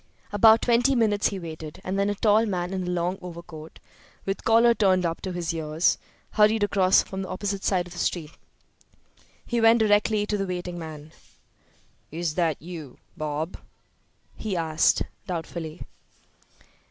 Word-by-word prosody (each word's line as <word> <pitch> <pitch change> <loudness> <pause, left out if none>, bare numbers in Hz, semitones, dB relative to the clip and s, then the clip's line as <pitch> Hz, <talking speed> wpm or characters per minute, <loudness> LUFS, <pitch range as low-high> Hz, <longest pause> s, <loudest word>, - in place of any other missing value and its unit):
About 220 +2 +6
twenty 245 +3 +3
minutes 215 -3 +2
he 200 - -3
waited, 160 -3 -8
and 190 +1 -2
then 200 +1 +2
a 205 - -1
tall 215 +2 +3
man 180 -2 -2
in 185 -2 -3
a - - -2
long 180 +1 -1
overcoat, 170 -3 -10 0.5
with 195 0 -3
collar 230 +1 +5
turned 185 -5 +2
up 165 0 -2
to 190 - -4
his 175 -1 -3
ears, 160 +1 +1 0.3
hurried 215 0 +4
across 195 -2 +4
from 190 0 -6
the 190 - -5
opposite 195 +1 -3
side 180 -3 +1
of 175 - -11
the 175 - -8
street. 160 -4 -2 1.1
He 235 -1 -1
went 225 +1 +6
directly 210 -1 +2
to 210 0 -1
the 195 -1 -2
waiting 180 -1 -4
man. 155 -2 -9 1.0
"Is 165 0 -2
that 165 -3 0
you, 160 -5 -9 0.2
Bob?" 155 +2 -3 0.8
he 205 -4 -3
asked, 160 -1 +2 0.2
doubtfully. 165 -2 -5
185 Hz, 155 wpm, -25 LUFS, 165-205 Hz, 1.1 s, About